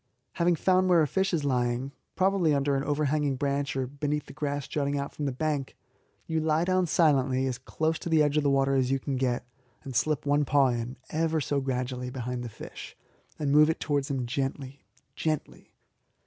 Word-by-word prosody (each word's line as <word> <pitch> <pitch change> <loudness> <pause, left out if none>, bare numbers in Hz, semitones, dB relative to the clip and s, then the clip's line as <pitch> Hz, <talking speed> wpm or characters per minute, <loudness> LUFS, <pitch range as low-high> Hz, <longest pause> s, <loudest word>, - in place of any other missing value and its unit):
Having 170 0 +2
found 185 +3 +2
where 170 -3 +5
a - - +1
fish 190 +5 0
is 160 -5 0
lying, 125 0 0 0.2
probably 185 -5 +2
under 140 0 +1
an 135 - 0
overhanging 145 -1 0
branch 140 0 -1
or 130 -1 0
beneath 145 +2 -3
the - - -11
grass 145 -1 -3
jutting 145 -1 -1
out 140 0 -4
from 150 - -4
the 140 - 0
bank, 145 0 -2 0.5
you 160 0 -1
lie 155 +1 +1
down 185 -1 +2
silently 135 -5 +3
as 130 -2 -2
close 160 +4 -1
to 170 - -5
the 160 -2 +4
edge 145 0 +1
of 150 - +3
the 145 - +2
water 135 0 +2
as 130 -2 +2
you 135 - +2
can 135 +1 -3
get, 125 -2 -1 0.4
and 135 -3 -7
slip 150 +3 +1
one 145 +1 +3
paw 140 -1 +3
in, 120 +1 -3
ever 160 0 +1
so 145 -1 -1
gradually, 125 -1 -3
behind 125 -1 -4
the 120 - -5
fish, - - -10 0.4
and 145 -2 -1
move 150 +2 +6
it 160 - -1
towards 145 -2 -1
him 135 -3 -1
gently 135 +1 -4 0.3
gently. 155 -2 -4
140 Hz, 205 wpm, -28 LUFS, 130-155 Hz, 0.5 s, move